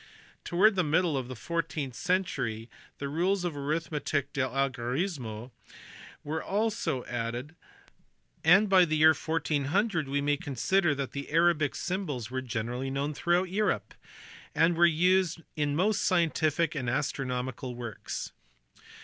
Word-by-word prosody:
Towards 200 +4 +4
the 185 - +2
middle 160 +1 +2
of 130 -2 -2
the 130 - -7
four 165 +8 -1
teenth 150 -5 -5
century 130 - -1 0.3
the 140 - -4
rules 180 +6 0
of 170 -4 -2
arithmetic 145 -1 -2
de 140 - 0
algorismo 130 - -2 0.7
were 155 +2 -3
also 205 - -1
added, 120 +6 -4 0.9
and 190 +6 +6
by 190 -2 +6
the 155 -2 +1
year 155 +1 +7
1400 160 +3 0
we 140 +1 0
may 145 +1 +1
consider 150 +5 +1
that 140 -1 -3
the 140 0 -6
Arabic 160 -2 +2
symbols 150 - -3
were 130 0 -2
generally 125 +2 -3
known 140 +2 -2
throughout 175 +4 +1
Europe, 210 +2 0 0.6
and 165 +1 +4
were 170 +1 +6
used 175 0 +2
in 145 -1 0
most 210 +5 +1
scientific 165 -2 +2
and 130 -6 -2
astronomical 130 -2 -2
works. 120 -3 -6
150 Hz, 135 wpm, -29 LUFS, 130-175 Hz, 0.9 s, year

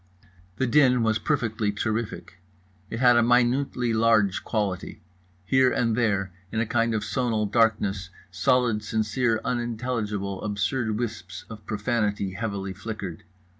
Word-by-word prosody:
The 130 - 0
din 125 -2 +4
was 110 -1 +1
perfectly 115 -7 0
terrific. 105 -4 -3 0.5
It 115 - -4
had 125 -2 +6
a - - +6
minutely 125 0 +2
large 110 -3 +3
quality. 100 -5 -2 0.5
Here 130 +5 +4
and 115 -2 +1
there, 100 -5 0 0.2
in 110 - -1
a 115 - +1
kind 115 0 +1
of 105 - -1
sonal 110 +1 0
darkness, 100 -4 +1 0.2
solid 110 +4 +2
sincere 110 +2 0
unintelligible 115 -5 -2
absurd 105 +2 -1
wisps 95 -6 -5
of 110 -2 -10
profanity 105 -3 -1
heavily 100 -2 -4
flickered. 100 -4 -7
110 Hz, 130 wpm, -26 LUFS, 100-120 Hz, 0.5 s, had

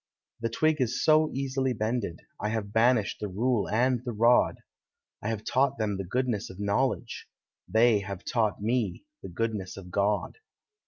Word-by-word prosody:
The 115 - -1
twig 155 +5 +1
is 130 +2 0
so 155 0 +5
easily 130 -1 -1
bended, 110 -5 -2 0.2
I 105 - -1
have 105 -2 -3
banished 115 -1 +3
the 105 - -3
rule 110 +4 0
and 125 +2 +1
the 120 -2 -4
rod; 115 +3 +4 0.6
I 105 - -2
have 110 -2 -3
taught 135 0 +1
them 105 -3 -1
the 95 - -3
goodness 115 +2 -1
of 95 - -11
knowledge. 115 +4 -1 0.4
They 110 -1 +4
have 100 -2 -7
taught 110 -4 0
me 120 - -1 0.2
the - - -8
goodness 110 -5 -3
of 90 -2 -10
God. 100 - 0
115 Hz, 165 wpm, -28 LUFS, 105-125 Hz, 0.6 s, so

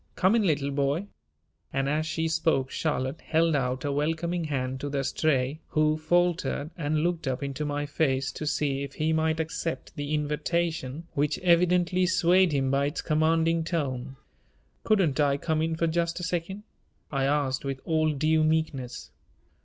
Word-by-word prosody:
Come 190 +5 +3
in, 230 - +3
little 145 -7 +1
boy!" 140 +6 0 0.7
and 135 0 0
as 155 +2 0
she 160 +1 -1
spoke 160 -5 +1
Charlotte 145 -1 -2
held 165 0 +2
out 130 0 -1
a 145 - 0
welcoming 165 +4 -1
hand 130 -3 -2
to 145 - -4
the 140 -1 -1
Stray, 140 0 0
who 155 -1 +2
faltered 170 -1 0
and 155 -2 -1
looked 170 -4 -1
up 130 +1 -2
into 140 +2 -3
my 145 0 -2
face 135 -2 0
to 155 - -5
see 140 -2 0
if 140 0 -5
he 155 +1 0
might 160 0 +1
accept 160 +1 -4
the 145 +1 -2
invitation 150 0 -2
which 145 +1 0
evidently 180 +1 +3
swayed 185 0 +4
him 135 -2 +1
by 140 +1 +2
its 145 - -4
commanding 160 +1 +2
tone. 135 -6 -3 0.7
"Couldn't 190 -10 +2
I 140 -1 +3
come 155 +1 -1
in 160 0 0
for 165 - 0
just 170 +1 0
a - - -6
second?" 180 +3 -3 0.5
I 135 -2 0
asked 140 -2 0
with 135 -1 -3
all 155 -1 +2
due 155 +2 +2
meekness. 155 -6 -1
155 Hz, 170 wpm, -27 LUFS, 140-165 Hz, 0.7 s, swayed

